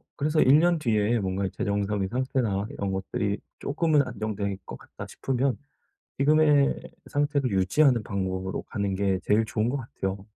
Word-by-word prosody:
그래서 155 Hz, +2 st, +1 dB
'1 140 Hz, +4 st, +6 dB
년 170 Hz, 0 st, +3 dB
뒤에 115 Hz, -3 st, +1 dB
뭔가 95 Hz, 0 st, -1 dB
재정상의 100 Hz, 0 st, -1 dB
상태나 125 Hz, -5 st, -1 dB
이런 100 Hz, -1 st, -3 dB
것들이 100 Hz, +2 st, -2 dB, 0.2 s
쪼끔은 155 Hz, +1 st, +2 dB
안정될 105 Hz, -4 st, -3 dB
것 -, -, -8 dB
같다.' -, -, -10 dB
싶으면 135 Hz, 0 st, -1 dB, 0.6 s
지금의 150 Hz, 0 st, +4 dB, 0.3 s
상태를 145 Hz, -2 st, 0 dB
유지하는 110 Hz, +6 st, +3 dB
방법으로 95 Hz, -1 st, -3 dB
가는 100 Hz, -2 st, -2 dB
게 95 Hz, -1 st, +1 dB
제일 105 Hz, +3 st, +3 dB
좋은 110 Hz, +1 st, -1 dB
것 140 Hz, -, -1 dB
같아요. 100 Hz, -6 st, -5 dB
110 Hz, 330 characters per minute, -26 LUFS, 100-140 Hz, 0.6 s, 1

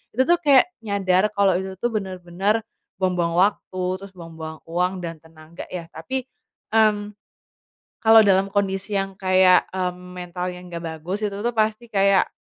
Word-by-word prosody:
itu 260 Hz, -, +3 dB
tuh 345 Hz, +3 st, +3 dB
kayak 280 Hz, 0 st, +6 dB, 0.2 s
nyadar 200 Hz, -1 st, +1 dB
kalau 200 Hz, -2 st, +4 dB
itu 190 Hz, -1 st, -7 dB
tuh 240 Hz, +3 st, -2 dB
benar-benar 190 Hz, +2 st, -1 dB, 0.3 s
buang-buang 180 Hz, -3 st, 0 dB
waktu, 185 Hz, -1 st, +1 dB, 0.2 s
terus 195 Hz, -, -9 dB
buang-buang 160 Hz, -2 st, -9 dB
uang 180 Hz, +3 st, 0 dB
dan 165 Hz, -2 st, -7 dB
tenaga 160 Hz, +1 st, -12 dB
ya. 175 Hz, -2 st, -6 dB
Tapi, 260 Hz, +11 st, -4 dB, 0.5 s
mmm, 210 Hz, -2 st, +2 dB, 0.9 s
kalau 225 Hz, 0 st, +8 dB
dalam 195 Hz, 0 st, +3 dB
kondisi 200 Hz, 0 st, -1 dB
yang 195 Hz, 0 st, -3 dB
kayak, 185 Hz, -1 st, +4 dB
mmm, 180 Hz, -1 st, -4 dB
mental 180 Hz, 0 st, -4 dB
yang 180 Hz, 0 st, -10 dB
nggak 170 Hz, -, -5 dB, 0.2 s
bagus, 185 Hz, +7 st, -4 dB
itu 200 Hz, -1 st, -2 dB
tuh 240 Hz, 0 st, 0 dB
pasti 220 Hz, +2 st, 0 dB
kayak 195 Hz, -2 st, +3 dB
190 Hz, 155 wpm, -23 LUFS, 180-210 Hz, 0.9 s, kalau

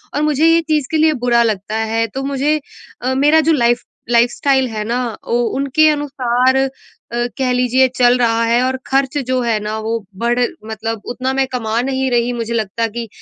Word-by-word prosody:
और 295 Hz, -, 0 dB
मुझे 300 Hz, +1 st, +2 dB
ये 330 Hz, 0 st, +4 dB
चीज़ 305 Hz, -4 st, -1 dB
के 320 Hz, -, +1 dB
लिए 310 Hz, 0 st, +4 dB
बुरा 235 Hz, -1 st, +4 dB
लगता 210 Hz, -1 st, -2 dB, 0.2 s
है 225 Hz, 0 st, +2 dB
तो 270 Hz, +5 st, -5 dB
मुझे 280 Hz, +2 st, 0 dB, 0.4 s
अ, 255 Hz, +1 st, -1 dB
मेरा 295 Hz, +4 st, +4 dB
जो -, -, +6 dB
लाइफ़ 240 Hz, -3 st, +2 dB, 0.3 s
लाइफ़स्टाइल 255 Hz, +3 st, +2 dB
है 215 Hz, -1 st, -4 dB
ना, 235 Hz, +3 st, -1 dB, 0.3 s
वो 240 Hz, +1 st, +1 dB, 0.2 s
उनके 280 Hz, +3 st, +3 dB
अनुसार 260 Hz, -3 st, +1 dB, 0.5 s
अ, 240 Hz, 0 st, -1 dB
कह 260 Hz, -2 st, 0 dB
लीजिए 250 Hz, +1 st, +3 dB
चल 245 Hz, 0 st, +4 dB
रहा 230 Hz, -1 st, +2 dB
है 235 Hz, +1 st, +2 dB
और 260 Hz, +1 st, 0 dB
ख़र्च 270 Hz, +1 st, 0 dB
जो 255 Hz, 0 st, +1 dB
है 230 Hz, -3 st, 0 dB
ना 215 Hz, +1 st, -3 dB
वो 220 Hz, +1 st, -3 dB, 0.3 s
बढ़ 240 Hz, +1 st, +1 dB, 0.3 s
मतलब 220 Hz, 0 st, -4 dB
उतना 255 Hz, +2 st, -2 dB
मैं 270 Hz, 0 st, +1 dB
कमा 230 Hz, -3 st, -2 dB
नहीं 265 Hz, 0 st, -1 dB
रही 240 Hz, 0 st, +1 dB
मुझे 235 Hz, -1 st, -4 dB
लगता 225 Hz, 0 st, -1 dB
कि 230 Hz, +1 st, -6 dB
250 Hz, 195 wpm, -17 LUFS, 235-270 Hz, 0.5 s, जो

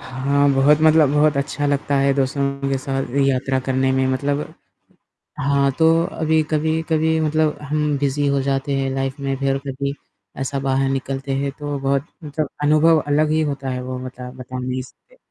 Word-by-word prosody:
हाँ, 140 Hz, +2 st, +1 dB
बहुत 140 Hz, +3 st, +5 dB
मतलब 155 Hz, -2 st, +5 dB
बहुत 150 Hz, 0 st, +3 dB
अच्छा 145 Hz, +1 st, -1 dB
लगता 145 Hz, 0 st, 0 dB
है 140 Hz, 0 st, +3 dB
दोस्तों 140 Hz, 0 st, -1 dB
के 135 Hz, -1 st, 0 dB
साथ 135 Hz, -1 st, -3 dB, 0.2 s
यात्रा 135 Hz, 0 st, +1 dB
करने 130 Hz, 0 st, +1 dB
में। 130 Hz, 0 st, +1 dB
मतलब 140 Hz, +2 st, -1 dB, 1.0 s
हाँ, 140 Hz, -1 st, +2 dB
तो 165 Hz, +1 st, +4 dB
अभी 160 Hz, -1 st, +1 dB
कभी-कभी 160 Hz, +1 st, +1 dB
मतलब 155 Hz, 0 st, +1 dB
हम 150 Hz, 0 st, 0 dB
बिज़ी 145 Hz, +1 st, 0 dB
हो 140 Hz, -1 st, +1 dB
जाते 135 Hz, +1 st, -1 dB
हैं 135 Hz, 0 st, -1 dB
लाइफ़ 135 Hz, +1 st, -3 dB
में, 135 Hz, -1 st, -1 dB
फ़िर 135 Hz, 0 st, 0 dB
कभी 140 Hz, +1 st, -3 dB, 0.5 s
ऐसा 135 Hz, +1 st, -2 dB
बाहर 135 Hz, 0 st, +1 dB
निकलते 135 Hz, 0 st, -3 dB
हैं। 140 Hz, +1 st, -1 dB
तो 145 Hz, -1 st, -3 dB
बहुत 135 Hz, +1 st, 0 dB, 0.2 s
मतलब 150 Hz, +1 st, -3 dB
अनुभव 155 Hz, +2 st, +4 dB
अलग 150 Hz, +1 st, +2 dB
ही 155 Hz, +1 st, +2 dB
होता 135 Hz, -1 st, -6 dB
है 125 Hz, 0 st, -3 dB
वो 130 Hz, 0 st, -5 dB
बता 125 Hz, -1 st, -8 dB
बता 130 Hz, 0 st, -8 dB
नहीं 125 Hz, 0 st, -3 dB
सकते, -, -, -19 dB
140 Hz, 175 wpm, -21 LUFS, 135-150 Hz, 1.0 s, बहुत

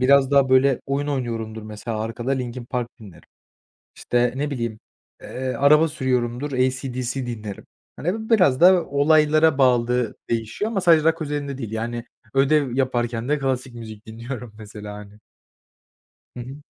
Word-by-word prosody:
biraz 135 Hz, +1 st, +5 dB
daha 140 Hz, -2 st, +4 dB
böyle 130 Hz, 0 st, +4 dB
oyun 140 Hz, +1 st, -1 dB
oynuyorumdur 115 Hz, -5 st, -3 dB
mesela 110 Hz, +1 st, -5 dB
arkada 115 Hz, +3 st, -4 dB
Linkin 125 Hz, -2 st, -3 dB
Park 120 Hz, 0 st, -3 dB
dinlerim. 100 Hz, -7 st, -13 dB, 0.7 s
İşte, 120 Hz, 0 st, 0 dB
ne 145 Hz, +2 st, -2 dB
bileyim, 115 Hz, -5 st, -4 dB, 0.4 s
eee, 130 Hz, 0 st, -4 dB
araba 150 Hz, +3 st, +5 dB
sürüyorumdur, 130 Hz, -1 st, -1 dB
AC/DC 130 Hz, -1 st, -1 dB
dinlerim. 110 Hz, -4 st, -6 dB, 0.3 s
Hani, 220 Hz, +7 st, -3 dB
biraz 180 Hz, -, +4 dB
da 180 Hz, -1 st, +6 dB
olaylara 155 Hz, +1 st, +4 dB
bağlı 125 Hz, -3 st, +2 dB
değişiyor 115 Hz, -, -2 dB
ama 195 Hz, -4 st, -1 dB
sadece 165 Hz, -3 st, +5 dB
rock 165 Hz, +1 st, -3 dB
özelinde 145 Hz, -2 st, -3 dB
değil. 115 Hz, -6 st, -6 dB
Yani, 115 Hz, +1 st, -4 dB, 0.3 s
ödev 135 Hz, -1 st, +2 dB
yaparken 120 Hz, -2 st, -1 dB
de 150 Hz, -, +2 dB
klasik 130 Hz, -2 st, -2 dB
müzik 110 Hz, -2 st, -10 dB
dinliyorum 115 Hz, +1 st, -7 dB
mesela, 105 Hz, -1 st, -9 dB
hani. 105 Hz, 0 st, -11 dB, 1.2 s
Hı -, -, -5 dB
hı 135 Hz, +4 st, -9 dB
130 Hz, 145 wpm, -23 LUFS, 115-140 Hz, 1.2 s, da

